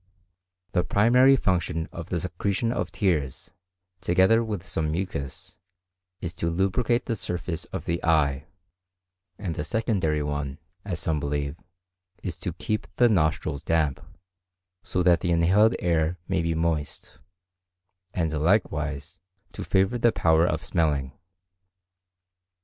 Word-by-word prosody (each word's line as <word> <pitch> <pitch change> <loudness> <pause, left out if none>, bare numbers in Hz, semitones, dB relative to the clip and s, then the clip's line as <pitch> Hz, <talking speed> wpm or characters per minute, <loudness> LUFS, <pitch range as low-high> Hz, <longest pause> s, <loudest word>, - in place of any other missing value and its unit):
The 90 - +2
primary 125 +8 +5
function 85 -7 0
of 85 -1 -8
the 90 - -1
secretion 100 +5 -1
of - - -2
tears, 75 - -1 0.5
together 95 +6 +4
with 105 -5 -4
some 80 -3 -2
mucus, 90 +2 -5 0.6
is 85 -1 -4
to 85 - 0
lubricate 100 +7 +1
the 115 - -1
surface 90 -4 -4
of - - -6
the 85 0 -2
eye; 75 -3 +2 0.9
and 90 -6 -4
a - - 0
secondary 80 -5 0
one, 75 -1 -3 0.3
as 90 -4 -3
some 80 -3 0
believe, 70 0 -2 0.7
is - - -3
to - - -3
keep 110 0 -3
the 120 -1 +5
nostrils 80 -7 0
damp, 80 -4 +1 0.8
so 90 +1 -1
that 85 -1 +5
the 90 - -2
inhaled 95 +7 +4
air 85 0 +1
may 95 -3 +1
be 85 0 -1
moist, 80 -2 -2 0.9
and 80 -3 -1
likewise 80 -3 0 0.3
to - - -6
favour 95 +5 +1
the 120 0 +4
power 80 -3 +3
of - - -1
smelling. 70 -5 0
85 Hz, 130 wpm, -26 LUFS, 80-95 Hz, 0.9 s, primary